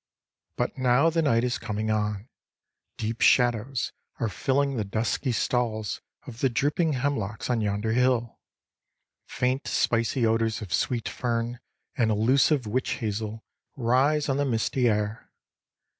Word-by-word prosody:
But 125 Hz, +2 st, -2 dB
now 130 Hz, +6 st, +4 dB
the 165 Hz, +1 st, +1 dB
night 115 Hz, -7 st, +2 dB
is 125 Hz, -1 st, -1 dB
coming 110 Hz, -1 st, -2 dB
on. 105 Hz, 0 st, -1 dB, 0.7 s
Deep 115 Hz, +1 st, -3 dB
shadows 120 Hz, +1 st, +3 dB, 0.3 s
are 115 Hz, -, 0 dB
filling 140 Hz, +5 st, 0 dB
the 110 Hz, -, -1 dB
dusky 110 Hz, +6 st, -1 dB
stalls 110 Hz, -3 st, -1 dB, 0.2 s
of 120 Hz, -2 st, -10 dB
the 135 Hz, -, +2 dB
drooping 150 Hz, +6 st, +1 dB
hemlocks 125 Hz, -5 st, -2 dB
on 120 Hz, -2 st, +1 dB
yonder 105 Hz, +1 st, -1 dB
hill. 125 Hz, -1 st, +1 dB, 0.9 s
Faint 130 Hz, +2 st, -1 dB
spicy 115 Hz, +1 st, +1 dB
odors 115 Hz, 0 st, +1 dB
of 100 Hz, -3 st, -6 dB
sweet 120 Hz, +3 st, 0 dB
fern 120 Hz, 0 st, -2 dB, 0.4 s
and 120 Hz, -5 st, +2 dB
illusive 130 Hz, +5 st, +3 dB
witch 125 Hz, +5 st, -1 dB
hazel 110 Hz, 0 st, -4 dB, 0.3 s
rise 135 Hz, +4 st, +2 dB
on 135 Hz, -1 st, 0 dB
the 145 Hz, -, +1 dB
misty 120 Hz, 0 st, +1 dB
air. 105 Hz, 0 st, -2 dB
120 Hz, 135 wpm, -26 LUFS, 110-130 Hz, 0.9 s, now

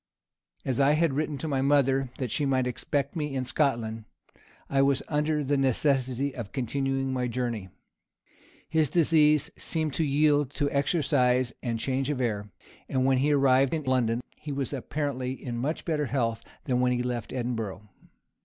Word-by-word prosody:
As 130 Hz, -1 st, -1 dB
I 140 Hz, +1 st, +5 dB
had 160 Hz, -1 st, +2 dB
written 150 Hz, +1 st, -1 dB
to 160 Hz, -, -4 dB
my 135 Hz, -3 st, 0 dB
mother 135 Hz, -1 st, +3 dB
that 125 Hz, -4 st, -3 dB
she 150 Hz, -, 0 dB
might 130 Hz, -2 st, +2 dB
expect 140 Hz, +3 st, -2 dB
me 150 Hz, -4 st, -2 dB
in 130 Hz, -1 st, -1 dB
Scotland, 115 Hz, -5 st, 0 dB, 0.6 s
I 135 Hz, 0 st, +2 dB
was 135 Hz, -1 st, +2 dB
under 150 Hz, 0 st, 0 dB
the 140 Hz, +1 st, +1 dB
necessity 135 Hz, 0 st, +1 dB
of 115 Hz, -6 st, -6 dB
continuing 135 Hz, +1 st, -1 dB
my 125 Hz, -1 st, 0 dB
journey. 120 Hz, -5 st, -3 dB, 1.0 s
His 160 Hz, -3 st, +2 dB
disease 150 Hz, -2 st, +3 dB
seemed 155 Hz, -3 st, -2 dB
to 160 Hz, -, 0 dB
yield 145 Hz, -1 st, +3 dB
to 145 Hz, -2 st, 0 dB
exercise 135 Hz, -5 st, +2 dB
and 120 Hz, -3 st, -2 dB
change 135 Hz, +3 st, -1 dB
of 145 Hz, -3 st, -1 dB
air; 105 Hz, -4 st, -1 dB, 0.4 s
and 130 Hz, -1 st, +1 dB
when 135 Hz, -1 st, +3 dB
he 145 Hz, +3 st, +2 dB
arrived 135 Hz, 0 st, +4 dB
in 155 Hz, -, -3 dB
London, 125 Hz, -3 st, +1 dB, 0.2 s
he 150 Hz, -, -7 dB
was 140 Hz, 0 st, -3 dB
apparently 135 Hz, -1 st, -2 dB
in 120 Hz, -2 st, -6 dB
much 145 Hz, +7 st, -2 dB
better 150 Hz, -4 st, 0 dB
health 115 Hz, -4 st, -1 dB, 0.2 s
than 125 Hz, -3 st, 0 dB
when 125 Hz, 0 st, +3 dB
he 125 Hz, 0 st, -1 dB
left 120 Hz, -3 st, -3 dB
Edinburgh. 115 Hz, -5 st, -3 dB
135 Hz, 170 wpm, -27 LUFS, 125-145 Hz, 1.0 s, I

